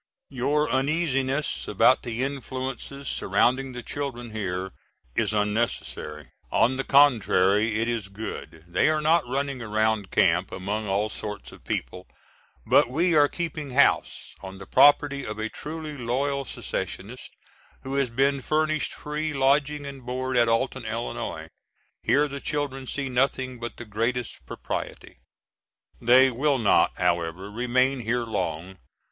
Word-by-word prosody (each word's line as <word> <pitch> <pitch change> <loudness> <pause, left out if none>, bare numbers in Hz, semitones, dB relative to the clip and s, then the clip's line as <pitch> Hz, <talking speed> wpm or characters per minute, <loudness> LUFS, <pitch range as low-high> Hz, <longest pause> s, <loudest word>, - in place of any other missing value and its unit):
Your 145 +4 +1
uneasiness 135 0 0
about - - +4
the 120 +1 -3
influences 135 0 -5
surrounding 130 +2 +1
the 125 0 -7
children 125 -5 -5
here 95 -3 -3 0.4
is - - +1
unnecessary. 105 - -2 0.2
On 125 +4 +3
the 135 - -1
contrary 110 -7 +4
it 115 - 0
is 115 -5 -2
good. 95 -5 -8
They 90 - +2
are 155 0 +2
not 155 -1 +3
running 135 0 -2
around 110 -2 0
camp 85 +3 +2
among 105 +3 -3
all 100 +2 +1
sorts 105 0 -6
of - - -15
people, 90 0 -4 0.6
but - - +4
we 170 +7 +1
are 145 -2 +6
keeping 160 -3 -4
house, 140 - +2
on 95 0 -8
the 95 - -10
property 145 +2 +4
of 105 -2 -5
a 110 +1 -3
truly 155 +2 -6
loyal 135 +3 -1
secessionist - - -5 0.5
who 135 - -5
has 140 -2 +1
been 135 +3 +1
furnished 155 +2 0
free 150 +1 -3
lodging 140 +2 +2
and 140 -2 -8
board 130 +1 -3
at 120 -1 +4
Alton, 115 0 0
Illinois; 60 - -4 0.5
here 145 +1 +3
the 140 -1 -7
children 135 -3 -3
see 140 +1 -3
nothing 130 -1 0
but 120 -1 -6
the 120 - -8
greatest 115 +3 -2
propriety. - - -6 0.8
They 130 +2 +6
will 140 +3 +1
not, 110 -5 +3
however, 90 +2 -1
remain 125 +4 +1
here 120 +1 -1
long. 95 -4 -4
125 Hz, 140 wpm, -26 LUFS, 110-140 Hz, 0.8 s, are